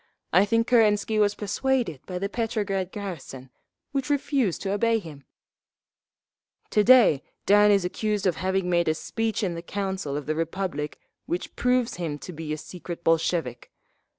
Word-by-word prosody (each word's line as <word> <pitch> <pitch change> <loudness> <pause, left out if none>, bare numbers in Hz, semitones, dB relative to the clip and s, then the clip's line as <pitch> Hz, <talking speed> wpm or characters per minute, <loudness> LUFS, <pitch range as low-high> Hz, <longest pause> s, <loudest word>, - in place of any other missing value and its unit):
I 185 +4 +6
think 230 +2 +2
Kerensky 215 -2 +3
was 205 -1 +3
persuaded 210 - -1
by 180 - -4
the 195 +2 -1
Petrograd 205 -4 -2
garrison, 145 -10 -7 0.4
which 275 -1 -2
refused 275 - 0
to 195 - -1
obey 230 +3 +2
him…. 155 - -9 1.5
"To 210 - +4
day 225 - +6 0.2
Dan 205 +1 +6
is 200 -3 +3
accused 210 +2 -1
of 180 -4 +1
having 190 0 0
made 170 -1 +2
a 155 - +2
speech 225 +5 -2
in 180 -3 0
the 170 - -5
Council 190 -5 -3
of 145 - -5
the 155 - 0
Republic 165 -2 -3 0.3
which 175 - -4
proves 250 -1 +1
him 160 -4 -3
to 180 - -9
be 155 -1 -6
a 155 - -1
secret 175 +1 -8
Bolshevik…. 165 -6 0
190 Hz, 160 wpm, -26 LUFS, 165-215 Hz, 1.5 s, I